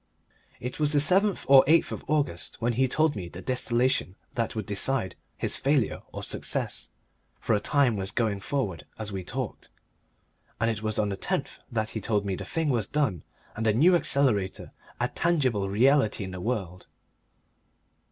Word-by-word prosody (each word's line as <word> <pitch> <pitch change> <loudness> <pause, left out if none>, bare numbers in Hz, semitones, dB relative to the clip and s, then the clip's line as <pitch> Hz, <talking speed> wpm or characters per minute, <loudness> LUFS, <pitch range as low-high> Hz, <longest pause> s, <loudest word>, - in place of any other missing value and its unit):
It 125 +4 -5
was 150 0 +3
the - - +3
7th 185 +7 +3
or 135 -1 +8
8th 165 +3 +3
of - - -6
August 145 - -1
when 120 +1 0
he 130 +3 +2
told 155 +3 +2
me 90 -4 -5
the 85 - -9
distillation 125 -3 0 0.2
that 115 -1 -2
would 110 -3 -3
decide 100 +1 0 0.2
his - - +1
failure 135 -6 +1
or - - -6
success - - -2 0.5
for - - 0
a 105 - +3
time 130 -1 +2
was 95 -1 -3
going 110 -3 -1
forward 105 - -3
as 110 -2 -5
we 95 -1 -4
talked, 125 +4 -5 0.9
and 115 +1 +2
it 105 -2 -5
was 110 -1 -2
on 105 -1 +1
the 100 - -3
10th - - -3
that 110 -2 -1
he 110 - -4
told 105 -2 0
me 100 - -1
the 95 - -6
thing 155 - -1
was 115 -5 0
done 135 - 0 0.3
and 110 - -3
the 110 -1 +3
New 170 - +5
Accelerator 130 - +1 0.3
a - - +1
tangible 130 - 0
reality 115 0 +3
in 95 - -6
the 90 -1 -7
world. 95 -6 -3
115 Hz, 180 wpm, -27 LUFS, 100-140 Hz, 0.9 s, or